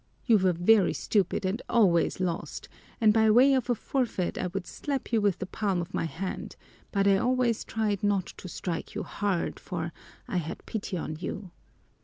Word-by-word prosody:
You 225 Hz, -5 st, +5 dB
were 185 Hz, -1 st, +3 dB
very 185 Hz, +3 st, +4 dB
stupid 195 Hz, -2 st, 0 dB
and 195 Hz, +6 st, -1 dB
always 185 Hz, -9 st, +3 dB
lost, 175 Hz, -3 st, -3 dB, 0.3 s
and 215 Hz, -3 st, +5 dB
by 220 Hz, 0 st, +4 dB
way 255 Hz, +5 st, +6 dB
of 255 Hz, -2 st, 0 dB
a 245 Hz, -, +3 dB
forfeit 225 Hz, -6 st, -1 dB
I 185 Hz, -, -1 dB
would 185 Hz, 0 st, -4 dB
slap 280 Hz, -3 st, -4 dB
you 225 Hz, -, +4 dB
with 200 Hz, -3 st, +2 dB
the 190 Hz, -, -4 dB
palm 195 Hz, -1 st, -1 dB
of 175 Hz, +2 st, -5 dB
my -, -, 0 dB
hand, 175 Hz, +4 st, -5 dB, 0.4 s
but 200 Hz, -1 st, +2 dB
I 195 Hz, -1 st, +5 dB
always 245 Hz, 0 st, +1 dB
tried 210 Hz, -3 st, -1 dB
not 200 Hz, -3 st, +2 dB
to -, -, -8 dB
strike 170 Hz, -1 st, -4 dB
you -, -, -2 dB
hard, 200 Hz, -4 st, -2 dB
for 170 Hz, -3 st, -4 dB, 0.3 s
I 185 Hz, -, -2 dB
had 160 Hz, -2 st, -4 dB
pity 205 Hz, -4 st, -3 dB
on 155 Hz, -2 st, -4 dB
you. 185 Hz, +1 st, -5 dB
200 Hz, 190 wpm, -28 LUFS, 180-225 Hz, 0.4 s, way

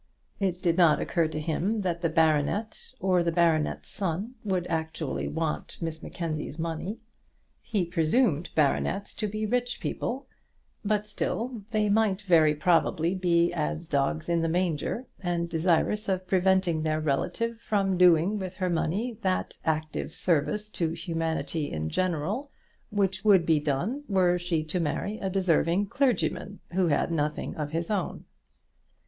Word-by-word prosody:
It 185 Hz, -3 st, -1 dB
did 170 Hz, 0 st, +2 dB
not 165 Hz, -4 st, +6 dB
occur 170 Hz, -3 st, +1 dB
to 155 Hz, 0 st, -4 dB
him 175 Hz, +8 st, -1 dB
that 175 Hz, -3 st, -2 dB
the 165 Hz, -, +1 dB
baronet 160 Hz, -, +1 dB
or 185 Hz, -2 st, +3 dB
the 170 Hz, 0 st, +1 dB
baronet's 165 Hz, -2 st, +1 dB
son 195 Hz, +5 st, -3 dB
would 185 Hz, -4 st, 0 dB
actually 160 Hz, -3 st, -2 dB
want 160 Hz, 0 st, -3 dB
Miss 165 Hz, -1 st, -4 dB
Mackenzie's 155 Hz, -3 st, -4 dB
money. 165 Hz, +6 st, -3 dB, 0.6 s
He 210 Hz, -6 st, -1 dB
presumed 170 Hz, -, +2 dB
baronets 160 Hz, +6 st, +1 dB
to 215 Hz, -, -2 dB
be 215 Hz, +1 st, -3 dB
rich 245 Hz, +2 st, -1 dB
people; 260 Hz, +3 st, -3 dB, 0.6 s
but 210 Hz, 0 st, 0 dB
still 235 Hz, +2 st, -3 dB
they 215 Hz, -2 st, +1 dB
might 210 Hz, -1 st, +2 dB
very 160 Hz, -5 st, +5 dB
probably 165 Hz, +1 st, +2 dB
be 175 Hz, -2 st, +2 dB
as 75 Hz, +1 st, -2 dB
dogs 140 Hz, +3 st, 0 dB
in 170 Hz, -1 st, +2 dB
the 165 Hz, -, 0 dB
manger, 175 Hz, -, -1 dB
and 175 Hz, -2 st, -1 dB
desirous 175 Hz, +5 st, +1 dB
of 185 Hz, -1 st, 0 dB
preventing 185 Hz, -3 st, +2 dB
their 155 Hz, 0 st, 0 dB
relative 225 Hz, -, -1 dB
from 195 Hz, -4 st, +1 dB
doing 180 Hz, +3 st, +5 dB
with 185 Hz, -1 st, -5 dB
her 185 Hz, -1 st, -1 dB
money 205 Hz, +8 st, -1 dB
that 185 Hz, -2 st, -1 dB
active 155 Hz, 0 st, -2 dB
service 205 Hz, +6 st, 0 dB
to 165 Hz, -4 st, -1 dB
humanity 165 Hz, -3 st, -2 dB
in 80 Hz, 0 st, -3 dB
general 185 Hz, -, -1 dB, 0.4 s
which 195 Hz, -3 st, 0 dB
would 195 Hz, -5 st, +5 dB
be 160 Hz, -2 st, +4 dB
done 170 Hz, -, -1 dB
were 180 Hz, -2 st, +3 dB
she 170 Hz, -3 st, 0 dB
to 155 Hz, +4 st, -2 dB
marry 200 Hz, +6 st, -2 dB
a 195 Hz, -, -2 dB
deserving 185 Hz, 0 st, +2 dB
clergyman 205 Hz, -4 st, 0 dB
who 180 Hz, 0 st, +2 dB
had 160 Hz, +2 st, +1 dB
nothing 150 Hz, -2 st, -1 dB
of 150 Hz, -2 st, -3 dB
his 165 Hz, +5 st, -2 dB
own. 195 Hz, -4 st, -2 dB
175 Hz, 150 wpm, -28 LUFS, 160-200 Hz, 0.6 s, not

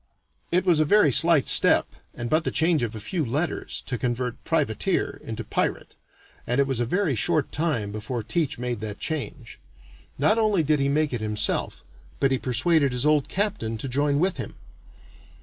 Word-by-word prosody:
It 180 Hz, +2 st, +1 dB
was 170 Hz, -4 st, +3 dB
a -, -, +5 dB
very 155 Hz, -1 st, +4 dB
slight 165 Hz, +1 st, +5 dB
step, -, -, +6 dB, 0.3 s
and 120 Hz, -, -5 dB
but 155 Hz, +6 st, +1 dB
the -, -, -1 dB
change 160 Hz, -1 st, +2 dB
of 115 Hz, -2 st, -3 dB
a -, -, -6 dB
few 160 Hz, -, -3 dB
letters, 145 Hz, +7 st, -3 dB
to 125 Hz, -3 st, -4 dB
convert 125 Hz, +1 st, -3 dB
"privateer" -, -, -1 dB
into -, -, -6 dB
"pirate," -, -, -3 dB, 0.5 s
and 125 Hz, +3 st, 0 dB
it 140 Hz, -, +4 dB
was 135 Hz, -3 st, -2 dB
a 120 Hz, -, 0 dB
very 180 Hz, -, 0 dB
short 155 Hz, +5 st, 0 dB
time 145 Hz, -10 st, -1 dB
before 110 Hz, +3 st, -5 dB
Teach 145 Hz, +6 st, -1 dB
made 120 Hz, -2 st, -3 dB
that 105 Hz, -1 st, -5 dB
change. 140 Hz, -6 st, -5 dB, 0.6 s
Not 210 Hz, -, +2 dB
only 210 Hz, -6 st, +2 dB
did 150 Hz, 0 st, +1 dB
he 140 Hz, 0 st, +1 dB
make 150 Hz, 0 st, 0 dB
it 120 Hz, -, -2 dB
himself, 105 Hz, -1 st, -1 dB, 0.3 s
but 135 Hz, -, +2 dB
he 130 Hz, -, +1 dB
persuaded 140 Hz, +3 st, +1 dB
his 125 Hz, +2 st, -1 dB
old 150 Hz, -2 st, +2 dB
captain 185 Hz, -, -2 dB
to 120 Hz, -, -5 dB
join 140 Hz, +2 st, 0 dB
with 185 Hz, +4 st, 0 dB
him. -, -, -6 dB
140 Hz, 185 wpm, -24 LUFS, 120-160 Hz, 0.6 s, step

